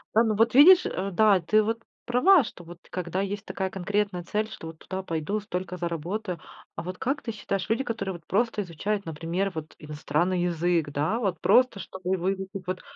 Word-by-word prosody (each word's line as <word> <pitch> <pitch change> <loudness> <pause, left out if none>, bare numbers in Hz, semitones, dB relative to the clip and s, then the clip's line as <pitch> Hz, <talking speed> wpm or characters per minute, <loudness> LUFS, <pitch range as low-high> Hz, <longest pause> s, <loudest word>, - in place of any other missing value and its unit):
Да, 225 - +6
ну 220 -2 +1
вот 225 +2 +3
видишь, 355 +6 +9
э, 195 +2 -2
да, 205 0 +5
ты 215 +6 +3
вот 225 +2 -1 0.3
права, 295 +8 +5
что 175 -6 -10
вот 175 +1 -11
когда 180 +1 -2
есть 200 +1 -4
такая 190 -1 -3
конкретная 195 0 -1
цель: 215 +5 -2
"Что 165 - -8
вот 160 -1 -10
туда 190 0 -5
пойду, 165 +4 -2
столько 185 -3 -5
заработаю". 175 +2 -3 0.4
А - - -5
вот 180 +1 -6
как 280 +3 -1
ты 230 - -4
считаешь, 200 -3 -3
люди, 235 +5 +1
которые 200 -5 -3
вот 170 -2 -11
просто 225 +1 +1
изучают, 195 +3 -3
например, 165 +5 -2
вот 155 -1 -6
иностранный 155 +4 -1
язык, 170 -2 +1
да, 145 +9 0
вот 190 -8 -1
просто 250 -5 +4
чтобы 190 0 -3
выучить 190 +2 -2 0.2
вот- 185 0 -3
190 Hz, 195 wpm, -27 LUFS, 175-215 Hz, 0.4 s, видишь